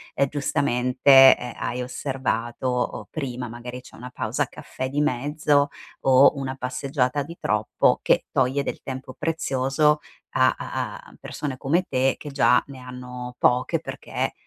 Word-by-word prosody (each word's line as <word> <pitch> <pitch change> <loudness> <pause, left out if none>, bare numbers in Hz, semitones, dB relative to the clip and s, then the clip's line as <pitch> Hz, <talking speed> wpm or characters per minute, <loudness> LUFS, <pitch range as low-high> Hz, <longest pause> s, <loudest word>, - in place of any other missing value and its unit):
ehm, 140 - +2
giustamente, 135 -1 +5
eh, 125 -1 -7
hai 125 +1 -3
osservato, 125 -2 -3
o 125 -1 -2
prima 125 -5 -4
magari 120 +2 -8
c'è 130 - -15
una 125 +1 -9
pausa 125 - -2
caffè 130 0 -6
di 145 +2 0
mezzo 145 +1 +1 0.3
o 135 +1 +6
una 135 -1 -3
passeggiata 130 +1 -1
di 170 +5 -8
troppo 105 0 +1
che - - +2
toglie 130 +2 +1
del - - -5
tempo 130 -1 -7
prezioso 150 -1 +1 0.4
a - - +4
a - - -4
a - - -16
persone 140 -3 -5
come 165 +8 +1
te 130 0 +1
che 145 - -8
già 135 -3 +4
ne 135 -2 -10
hanno 125 -1 -8
poche 125 +1 +2
perché, - - -4
130 Hz, 150 wpm, -24 LUFS, 125-140 Hz, 0.4 s, o